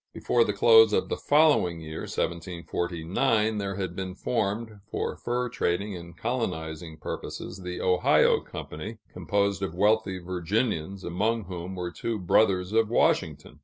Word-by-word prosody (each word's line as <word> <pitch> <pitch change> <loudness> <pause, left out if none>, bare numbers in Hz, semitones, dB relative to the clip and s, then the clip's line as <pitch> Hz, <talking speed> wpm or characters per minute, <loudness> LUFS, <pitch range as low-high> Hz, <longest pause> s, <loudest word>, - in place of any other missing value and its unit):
Before 120 - +2
the 105 - 0
close 110 +1 +6
of - - +1
the - - 0
following 145 - +3
year 80 -1 -7
(1749), 90 +6 -1
there 100 -1 -3
had 95 -2 -4
been 95 -1 -5
formed, 110 0 -2
for - - -2
fur 125 +1 -2
trading 100 -4 -1
and 85 -1 -10
colonizing 80 -9 -3
purposes, 90 +4 -6
the 90 0 -5
Ohio 90 -1 +4
Company, 110 +9 -7 0.2
composed 100 -1 0
of 95 -4 -3
wealthy 105 0 +2
Virginians, 95 +1 -2
among 110 +6 0
whom 90 0 -6
were 90 -1 -4
two 110 +7 -3
brothers 95 0 +2
of 110 -1 +3
Washington. 75 - 0
95 Hz, 140 wpm, -27 LUFS, 85-110 Hz, 0.2 s, close